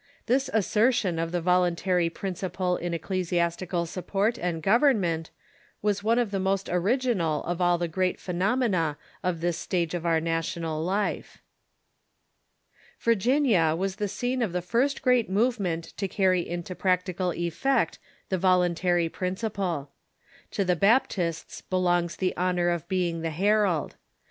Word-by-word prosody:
This 265 +3 +1
assertion 220 -4 +2
of 165 0 -2
the 175 -1 -1
voluntary 180 0 +2
principle 185 0 -2
in 175 0 -3
ecclesiastical 170 0 -1
support 195 +6 -1
and 170 -3 -2
government 195 - +2 0.5
was 205 -1 +1
one 230 +2 +2
of 240 -4 +1
the 195 - -1
most 195 +1 0
original 180 - +1
of 175 +1 -3
all 175 0 +3
the 175 0 -1
great 185 +2 -1
phenomena 180 - 0 0.3
of 175 -3 -1
this 175 -1 -1
stage 170 -2 -1
of 175 -2 -3
our 165 -2 +2
na 165 0 0
tional 165 -1 -3
life. 195 +4 -2 1.6
Virginia 230 - +3
was 190 +2 -2
the 210 -1 -1
scene 250 +5 -2
of 210 -7 -1
the 180 - -1
first 245 +11 0
great 250 -5 +3
movement 195 -6 0
to 195 - -1
carry 185 -1 +2
into 175 +1 -4
practical 180 0 0
effect 175 +11 0 0.3
the 185 - 0
voluntary 180 -1 +2
principle. 185 -5 -3 0.6
To 200 - -1
in^virg^nPa^ - - -5
the 180 - +4
Baptists 195 -5 +1
belongs 175 -2 0
the 185 -1 -1
honor 180 -1 +1
of 170 -3 -2
being 175 -3 0
the 165 - -1
herald. 195 -1 +1
180 Hz, 145 wpm, -27 LUFS, 170-205 Hz, 1.6 s, the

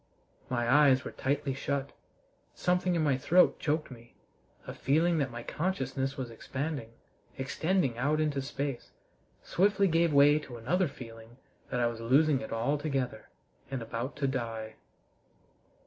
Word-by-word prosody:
My 120 -2 0
eyes 135 0 +5
were - - -5
tightly 140 0 -1
shut; 140 +1 -2 0.6
something 180 0 +1
in 165 - +1
my 140 -4 +2
throat 180 +7 +4
choked 150 -1 -1
me; 120 -1 -13 0.5
a - - -6
feeling 160 +4 +2
that 135 -2 0
my 120 -1 -7
consciousness 135 -6 -2
was 125 -3 -4
expanding, 135 0 -5 0.4
extending 135 -1 0
out 150 +4 +1
into 150 -3 0
space, 135 -1 -4 0.5
swiftly 200 +1 +2
gave 165 -1 +3
way 145 +1 +6
to 125 -5 -9
another 170 +11 +1
feeling 115 -3 -11 0.3
that 125 - -1
I 120 - +3
was 115 -1 -2
losing 135 +4 +3
it - - -7
altogether, 130 -1 -1 0.4
and 135 -3 -3
about 115 +4 -4
to 140 -1 0
die. 115 -4 -3
135 Hz, 145 wpm, -30 LUFS, 120-155 Hz, 0.6 s, way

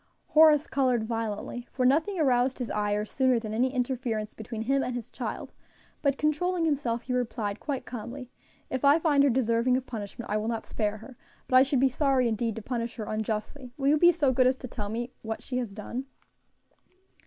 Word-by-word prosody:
Horace 310 -1 +6
colored 255 -4 +1
violently, 225 +1 -4
for 255 - 0
nothing 320 +9 +2
aroused 260 -3 +2
his 245 -3 -4
ire 210 0 0
sooner 260 +2 +2
than 220 -2 -4
any 250 +4 +1
interference 245 -4 -2
between 220 0 -6
him 270 +3 +2
and 250 -2 -2
his 240 -2 -6
child; - - -5 0.5
but 280 -2 +1
controlling 330 +3 +1
himself, 260 -6 0
he 255 - -3
replied 220 -4 -2
quite 280 -3 -4
calmly, 245 +2 -7 0.4
"If 260 - -2
I 285 +2 +6
find 300 -4 +3
her 285 - +5
deserving 240 0 +2
of 260 - -5
punishment, 220 -1 -7
I 210 - +2
will 215 +1 -2
not 230 -1 -2
spare 210 -1 -2
her; 235 +3 -13 0.3
but 255 - +1
I 255 - +9
should 270 0 +2
be 270 - +5
sorry 265 -2 +2
indeed 225 0 -1
to 225 - -7
punish 235 -1 -3
her 220 - -5
unjustly. 220 +5 -4
Will 275 -1 +1
you 300 - +5
be 345 +2 +7
so 295 -6 +1
good 255 0 +4
as 260 +1 +2
to 255 - -7
tell 210 -4 -5
me 240 +3 -3
what 220 0 -5
she 250 -1 -2
has 240 -5 -4
done?" 230 +5 -6
250 Hz, 205 wpm, -28 LUFS, 225-270 Hz, 0.5 s, I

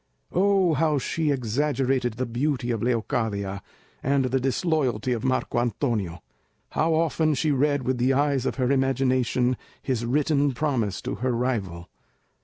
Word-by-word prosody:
Oh, 190 -2 +3
how 155 0 +2
she 155 +4 -1
exaggerated 130 -1 0
the 125 +4 -2
beauty 125 +1 -1
of 115 -3 -2
Leocadia, 110 -4 -1 0.4
and 135 0 +1
the 130 +1 +1
disloyalty 130 - 0
of 115 - -3
Marco 130 -2 0
Antonio! 115 - -1 0.5
How 160 +1 +1
often 160 -1 +1
she 155 +2 +1
read 145 0 +1
with 130 0 -1
the 125 +2 +3
eyes 140 -1 +1
of - - -2
her 130 0 +1
imagination 130 -2 +1 0.2
his 125 -3 -2
written 145 +2 +1
promise 120 -10 -1
to - - -3
her 130 -1 +1
rival! 105 -9 -2
130 Hz, 145 wpm, -25 LUFS, 120-145 Hz, 0.5 s, Oh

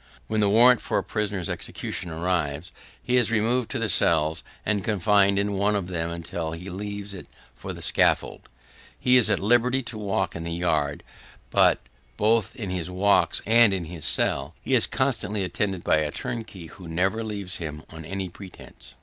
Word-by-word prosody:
When 110 - -2
the 105 -1 +3
warrant 120 +3 +6
for - - -2
a - - 0
prisoner's 105 -5 -2
execution 90 - -4
arrives, 80 -2 -2 0.3
he 125 - +1
is 120 -3 +4
removed 115 +2 +1
to - - -3
the - - -1
cells 80 0 +3 0.2
and 105 -2 0
confined 100 -1 +2
in 100 0 0
one 100 +2 +1
of 100 -3 -1
them 85 -2 -3
until 85 -1 -5
he 90 +4 -8
leaves 100 +1 -6
it 95 - -10 0.3
for - - -8
the - - +5
scaffold. - - +1 0.5
He 125 - +3
is 125 -3 +5
at 100 - +3
liberty 120 +5 +2
to 115 -2 -7
walk 95 -3 -2
in 85 - -5
the 85 0 -4
yard; 80 -5 -1 0.5
but, - - +4 0.4
both 110 0 +1
in 100 -6 -5
his 90 -1 -3
walks 95 +3 +2
and 115 -2 +5
in 90 -3 -4
his 80 -2 -9
cell, - - +1
he - - -3
is - - +5
constantly 110 -6 -1
attended 95 -1 -2
by - - +3
a 75 -1 0
turnkey 105 -1 -6
who 90 +2 -12
never 95 +7 -1
leaves 100 -4 -5
him 75 -2 -6
on 80 0 -9
any 95 +3 -4
pretence. 90 +1 -12
95 Hz, 185 wpm, -25 LUFS, 85-110 Hz, 0.5 s, warrant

